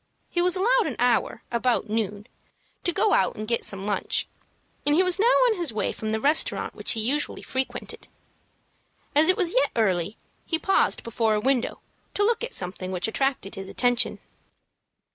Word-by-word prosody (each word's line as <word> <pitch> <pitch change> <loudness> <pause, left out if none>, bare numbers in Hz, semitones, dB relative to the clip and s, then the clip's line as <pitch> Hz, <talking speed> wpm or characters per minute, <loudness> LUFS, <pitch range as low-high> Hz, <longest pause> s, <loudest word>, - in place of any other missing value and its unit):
He 345 - +1
was 360 +1 +3
allowed 465 +3 +3
an 265 - -3
hour, 240 -1 +1
about 235 -1 +1
noon, 210 -1 -2 0.6
to 350 - +1
go 425 +5 +2
out - - +2
and 215 -1 -6
get 235 0 0
some 195 0 -4
lunch, 205 -1 0 0.6
and 290 0 +2
he 365 - +5
was 365 +1 0
now 445 - +4
on - - +4
his 340 -7 0
way 215 - -1
from 220 - -5
the 220 0 0
restaurant 295 +6 +1
which - - 0
he 225 - -1
usually 270 +7 -1
frequented. 260 0 -4 1.1
As 305 +3 +4
it 370 - +4
was 360 -5 +2
yet 275 +2 +3
early, 195 -3 +1 0.3
he 325 - -1
paused 390 +4 +1
before 225 -1 0
a - - +1
window 260 +2 0 0.3
to 410 - +2
look 470 +1 +1
at 480 0 -5
something 185 0 -5
which 180 +1 -1
attracted 265 -3 -1
his 195 -2 -6
attention. 245 +2 +2
250 Hz, 180 wpm, -25 LUFS, 215-350 Hz, 1.1 s, he